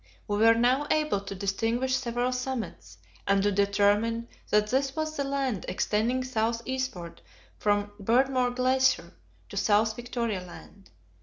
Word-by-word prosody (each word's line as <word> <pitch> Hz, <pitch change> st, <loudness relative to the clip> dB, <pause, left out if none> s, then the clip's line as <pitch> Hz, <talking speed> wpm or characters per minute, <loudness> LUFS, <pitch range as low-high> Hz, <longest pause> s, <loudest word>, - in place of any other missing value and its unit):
We 205 Hz, -, -1 dB
were 225 Hz, +2 st, +6 dB
now 255 Hz, +5 st, +2 dB
able 305 Hz, -9 st, +1 dB
to 200 Hz, 0 st, -7 dB
distinguish 225 Hz, +7 st, 0 dB
several 245 Hz, -1 st, -1 dB
summits, 245 Hz, -, -5 dB, 0.3 s
and 200 Hz, 0 st, +3 dB
to 205 Hz, -, +2 dB
determine 205 Hz, +3 st, +1 dB, 0.2 s
that 210 Hz, 0 st, +2 dB
this 270 Hz, +2 st, 0 dB
was 310 Hz, 0 st, -2 dB
the 280 Hz, -, -1 dB
land 275 Hz, -7 st, -2 dB
extending 225 Hz, +7 st, 0 dB
south 230 Hz, -2 st, -1 dB
eastward 255 Hz, -, -4 dB, 0.4 s
from 205 Hz, 0 st, +1 dB
Beardmore 250 Hz, +2 st, +2 dB
Glacier 260 Hz, +1 st, +2 dB, 0.4 s
in -, -, -7 dB
South 220 Hz, +1 st, +2 dB
Victoria 235 Hz, -4 st, -3 dB
Land. 190 Hz, +2 st, -13 dB
230 Hz, 140 wpm, -28 LUFS, 205-260 Hz, 0.4 s, were